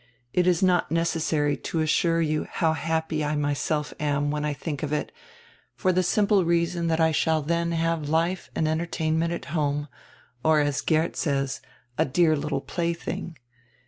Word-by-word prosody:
It 180 0 +2
is 180 0 +3
not 180 -4 +3
necessary 160 -3 +1
to 165 - -3
assure 165 +2 +2
you 155 -1 0
how 160 -2 +1
happy 160 0 -1
I 150 +1 0
myself 150 +1 -1
am 145 -1 0
when 150 0 -2
I 150 - 0
think 145 0 -5
of 150 - -3
it, 150 -1 -1 0.6
for 185 -3 +1
the 185 - +3
simple 200 +1 +3
reason 170 0 +1
that 160 0 +1
I 160 0 +4
shall 160 0 +1
then 170 +2 0
have 165 -2 0
life 170 +4 0
and 160 - +1
entertainment 160 0 0
at 170 - -4
home, 145 -2 0 0.5
or, 155 -1 +4
as 145 -1 +1
Geert 160 +1 +1
says, 140 -4 -1 0.4
'a - - +4
dear 155 +3 +3
little 145 -1 -2
plaything.' 170 -1 -3
160 Hz, 170 wpm, -26 LUFS, 150-170 Hz, 0.6 s, I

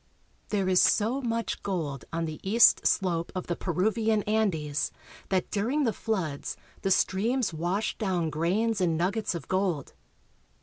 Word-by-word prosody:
There 200 -3 0
is 185 -1 +4
so 235 +6 +3
much 230 -2 -2
gold 155 -9 -3
on 165 0 -1
the 155 -1 -6
east 220 +5 +5
slope 170 -3 0
of 185 - -3
the 175 - -2
Peruvian 210 +5 0
An 220 0 +2
des 150 -4 -5 0.6
that 190 -2 0
during 245 +9 0
the 230 -5 +1
floods 180 -12 -3 0.2
the 195 - 0
streams 210 +4 +1
wash 175 +7 -1
down 180 -6 0
grains 195 +8 0
and 165 -3 +2
nuggets 195 +3 0
of 170 - -6
gold. 185 -7 -1
190 Hz, 150 wpm, -28 LUFS, 170-220 Hz, 0.6 s, east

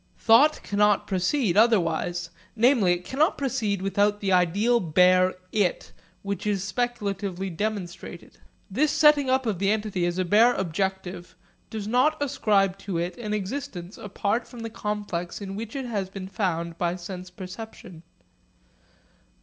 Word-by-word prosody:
Thought 280 +7 +4
cannot 205 0 +2
proceed 190 +2 0
otherwise; 175 -5 +2 0.2
namely, 230 -5 +4
it 175 0 -5
cannot 295 +4 +1
proceed 225 -8 -1
without 205 +1 +1
the 195 -2 -1
ideal 195 +7 +3
bare 185 +1 +4 0.2
'it' 205 -4 0 0.3
which 200 0 -4
is 200 -3 0
speculatively 195 -4 -3
demonstrated. 195 0 -5 0.3
This 275 +10 +1
setting 300 -2 +4
up 260 0 +2
of 210 -6 -1
the 195 0 +1
entity 210 -4 0
as 175 +1 -2
a 185 - 0
bare 225 +7 +5
objective 190 0 -3 0.3
does 215 -2 -5
not 255 +7 +2
ascribe 210 -9 +1
to 195 -3 -4
it 175 +1 -2
an 215 -3 -5
existence 205 -3 -5
apart 205 +3 -2
from 240 -2 -10
the 230 0 -5
complex 205 -5 -4
in 195 -1 -6
which 225 +4 -6
it 270 -2 -3
has 205 -6 -3
been 190 -1 -7
found 170 -4 -2
by 175 0 0
sense 185 0 -8
perception. 185 -2 -10
200 Hz, 145 wpm, -25 LUFS, 185-230 Hz, 0.3 s, bare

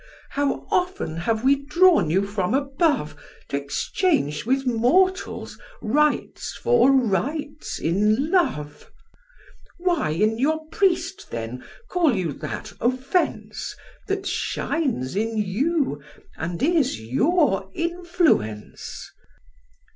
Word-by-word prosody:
How 285 0 -1
often 360 - 0
have 220 +7 -1
we 275 +2 +5
drawn 345 - +4
you 190 +5 +2
from 200 +2 -1
above, 275 - +1 0.3
T' - - -3
exchange 150 - 0
with 270 +1 +1
mortals 295 +11 +1 0.2
rites 300 +7 0
for 475 - +4
rites 275 - 0
in 210 - +1
love! 150 - 0 0.9
Why 350 - +1
in 215 +8 +1
your 315 +4 +1
priest, 380 +1 0
then, 115 +2 -5 0.2
call 335 -9 +2
you 175 -6 -1
that - - -6
offence, 255 - -1 0.3
That 395 0 -2
shines 255 - -1
in 220 +2 -1
you, 215 - 0 0.3
and 170 +7 -4
is 310 -4 +2
your 195 - +1
influence?" 340 - -1
265 Hz, 100 wpm, -24 LUFS, -, 0.9 s, we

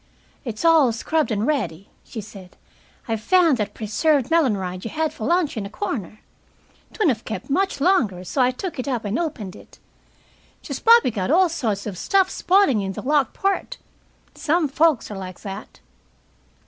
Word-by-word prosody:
"It's 230 +2 -5
all 320 -7 +5
scrubbed 310 +7 -1
and 215 -1 0
ready," 200 - -2 0.2
she 225 - -7
said. 195 -3 -13 0.5
"I 225 - 0
found 330 - +3
that 205 -2 -3
preserved 270 +6 +1
melon 290 -11 +3
rind 185 -1 -5
you 230 - -4
had 315 +3 -1
for 215 - -5
lunch 340 -4 +1
in 215 - -2
a - - -12
corner. 220 - -5 0.7
'Twouldn't 325 - +2
of 220 - -21
kept 220 +4 -6
much 380 +1 0
longer, 265 - +2
so 260 +8 -1
I 250 - +4
took 295 +4 -5
it 255 - -3
up 245 -5 -2
and 205 +7 -1
opened 220 - -4
it. - - -16 0.9
She's - - -5
probably 460 - +5
got 195 -2 -3
all 360 +4 +4
sorts 220 -11 -2
of 195 -5 -5
stuff 385 -1 +2
spoiling 360 - +3
in 195 0 -3
the - - -7
locked 280 -2 +1
part. 395 +5 -1 0.6
Some 320 +1 +1
folks're 300 -4 +2
like 185 -2 -8
that." 200 0 -8
255 Hz, 175 wpm, -22 LUFS, 210-330 Hz, 0.9 s, all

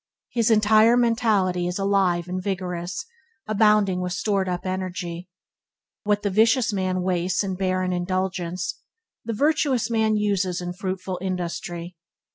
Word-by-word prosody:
His 230 -2 +1
entire 220 +2 +5
mentality 215 -7 +2
is 180 - -2
alive 195 -3 +1
and 185 +1 -3
vigorous, 180 -2 -3 0.4
abounding 210 -3 +3
with 180 -1 -2
stored 195 -1 0
up 180 0 -3
energy. 180 -1 -4 0.8
What 205 0 +1
the 205 - 0
vicious 225 +3 +3
man 185 -2 -1
wastes 185 +1 0
in 195 -1 -2
barren 185 -1 -1
indulgence, 185 0 -2 0.4
the 230 - -3
virtuous 280 -2 +1
man 220 -1 +2
uses 200 -4 0
in 175 0 -4
fruitful 185 0 -4
industry. 175 -2 -4
190 Hz, 130 wpm, -24 LUFS, 180-210 Hz, 0.8 s, entire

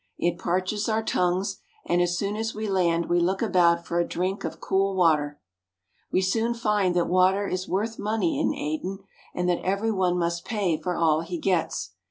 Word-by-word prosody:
It 175 0 0
parches 185 +5 -1
our 220 0 +1
tongues, 180 -1 0 0.3
and 175 - +2
as 175 0 +1
soon 200 +2 -2
as 225 +1 -3
we 215 0 -3
land 170 -4 +1
we 175 - +2
look 190 +5 +1
about 170 -4 +3
for 170 - -1
a - - +3
drink 185 +3 -2
of - - -5
cool 195 0 0
water. 150 -5 +2 0.7
We 185 - +2
soon 225 +5 +1
find 210 -6 +1
that 175 -1 +2
water 185 +3 +3
is 185 0 -3
worth 220 +4 -1
money 210 -5 0
in - - +2
Aden, 185 +6 -4 0.3
and 180 0 -1
that 175 -1 +1
every 200 +4 0
one 185 -3 +1
must 170 0 -1
pay 200 -7 0
for 175 +3 -3
all 160 -2 +2
he 175 +1 -5
gets. 170 - -1
185 Hz, 195 wpm, -26 LUFS, 170-200 Hz, 0.7 s, about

